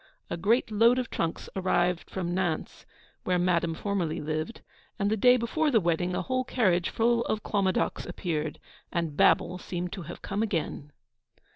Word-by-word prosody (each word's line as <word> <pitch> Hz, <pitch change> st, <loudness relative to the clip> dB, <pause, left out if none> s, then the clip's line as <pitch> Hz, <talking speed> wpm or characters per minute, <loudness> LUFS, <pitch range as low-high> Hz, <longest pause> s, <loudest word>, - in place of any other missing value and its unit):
A -, -, 0 dB
great 220 Hz, +6 st, +2 dB
load 230 Hz, +4 st, +5 dB
of 250 Hz, -2 st, -2 dB
trunks 165 Hz, -1 st, -2 dB
arrived 180 Hz, -3 st, +1 dB
from 175 Hz, -2 st, -3 dB
Nantes, 175 Hz, -4 st, -2 dB, 0.4 s
where 180 Hz, -1 st, +1 dB
Madame 170 Hz, -2 st, +1 dB
formerly 185 Hz, -4 st, -2 dB
lived; 155 Hz, +8 st, -3 dB, 0.4 s
and 200 Hz, +1 st, 0 dB
the -, -, +3 dB
day 250 Hz, +4 st, +6 dB
before 300 Hz, +7 st, 0 dB
the 235 Hz, -5 st, +4 dB
wedding 175 Hz, 0 st, 0 dB
a -, -, -1 dB
whole 255 Hz, -1 st, 0 dB
carriage 185 Hz, -9 st, +1 dB
full 235 Hz, +1 st, +2 dB
of 215 Hz, -, -2 dB
Clomadocs 195 Hz, -3 st, 0 dB
appeared, 160 Hz, -4 st, -3 dB, 0.3 s
and 165 Hz, -4 st, -2 dB
Babel 180 Hz, +4 st, +3 dB
seemed 180 Hz, 0 st, -4 dB
to 195 Hz, -, -5 dB
have 170 Hz, +1 st, -9 dB
come 200 Hz, +2 st, -2 dB
again. 160 Hz, -7 st, -2 dB
185 Hz, 165 wpm, -28 LUFS, 170-220 Hz, 0.4 s, day